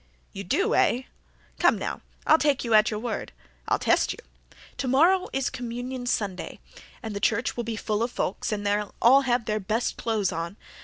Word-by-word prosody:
"You 195 Hz, -, -6 dB
do, 390 Hz, -, +1 dB
eh? 250 Hz, +2 st, +3 dB, 0.6 s
Come, -, -, +4 dB
now, -, -, -4 dB, 0.2 s
I'll 315 Hz, -, +6 dB
take 290 Hz, -2 st, +2 dB
you 230 Hz, -2 st, -1 dB
at 215 Hz, 0 st, +6 dB
your 210 Hz, -, -3 dB
word. 235 Hz, 0 st, -4 dB, 0.4 s
I'll -, -, +2 dB
test -, -, +2 dB
you. -, -, -13 dB, 0.6 s
Tomorrow 335 Hz, +9 st, +3 dB
is 270 Hz, -1 st, -1 dB
Communion 245 Hz, 0 st, -5 dB
Sunday 200 Hz, -6 st, -2 dB, 0.5 s
and 220 Hz, -2 st, -5 dB
the -, -, -2 dB
church 230 Hz, +3 st, +1 dB
will 240 Hz, -, -2 dB
be 230 Hz, -1 st, -3 dB
full 210 Hz, 0 st, -2 dB
of 235 Hz, -, +1 dB
folks 200 Hz, -4 st, -2 dB
and 205 Hz, -1 st, -3 dB
they'll 205 Hz, 0 st, -1 dB
all 265 Hz, +4 st, +6 dB
have 240 Hz, -1 st, +1 dB
their 215 Hz, -1 st, -1 dB
best 215 Hz, +5 st, -1 dB
clothes 215 Hz, -5 st, 0 dB
on. 170 Hz, +4 st, -4 dB
230 Hz, 190 wpm, -26 LUFS, 210-255 Hz, 0.6 s, I'll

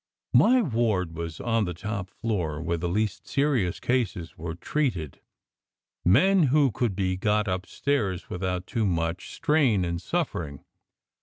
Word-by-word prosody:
My 250 Hz, +1 st, +6 dB
ward 110 Hz, -, 0 dB
was 85 Hz, -1 st, -5 dB
on 115 Hz, -2 st, +1 dB
the 90 Hz, -2 st, -4 dB
top 100 Hz, 0 st, -4 dB
floor, 90 Hz, -11 st, -2 dB
where 85 Hz, +1 st, -2 dB
the 85 Hz, +1 st, -2 dB
least 105 Hz, +2 st, -1 dB
serious 135 Hz, -11 st, +1 dB
cases 110 Hz, -9 st, -1 dB
were 80 Hz, +1 st, -5 dB
treated, 90 Hz, -, -2 dB, 0.8 s
men 170 Hz, -, +5 dB
who 140 Hz, -1 st, +4 dB
could 110 Hz, -1 st, -1 dB
be 95 Hz, -1 st, 0 dB
got 105 Hz, +2 st, +1 dB
upstairs 95 Hz, +1 st, -1 dB
with 90 Hz, -, -5 dB
out 90 Hz, -1 st, -1 dB
too 110 Hz, +1 st, 0 dB
much 85 Hz, 0 st, -1 dB
strain 130 Hz, -, +2 dB
and 85 Hz, 0 st, -3 dB
suffering. 70 Hz, -5 st, -3 dB
95 Hz, 145 wpm, -26 LUFS, 85-120 Hz, 0.8 s, My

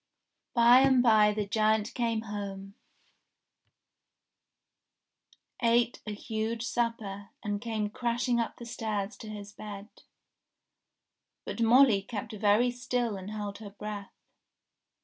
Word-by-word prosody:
By 240 Hz, +1 st, +7 dB
and 265 Hz, -2 st, +5 dB
by 215 Hz, -3 st, +5 dB
the 210 Hz, 0 st, -2 dB
giant 215 Hz, +1 st, +1 dB
came 230 Hz, -3 st, 0 dB
home, 200 Hz, -2 st, -6 dB, 2.9 s
ate 235 Hz, 0 st, +2 dB
a -, -, -2 dB
huge 220 Hz, +2 st, -3 dB
supper, 220 Hz, -5 st, -2 dB
and 205 Hz, -1 st, -2 dB
came 220 Hz, -3 st, -2 dB
crashing 240 Hz, +1 st, 0 dB
up 230 Hz, -, -2 dB
the 240 Hz, -, -9 dB
stairs 215 Hz, -3 st, -3 dB
to 220 Hz, -, -9 dB
his 205 Hz, -1 st, -8 dB
bed. 205 Hz, 0 st, -8 dB, 1.6 s
But -, -, -4 dB
Molly 230 Hz, -2 st, +6 dB
kept 215 Hz, +2 st, -6 dB
very 215 Hz, +4 st, +3 dB
still 245 Hz, -2 st, -2 dB
and 190 Hz, +1 st, -7 dB
held 205 Hz, -1 st, -5 dB
her 215 Hz, -2 st, -8 dB
breath. 205 Hz, 0 st, -7 dB
220 Hz, 115 wpm, -29 LUFS, 205-235 Hz, 2.9 s, By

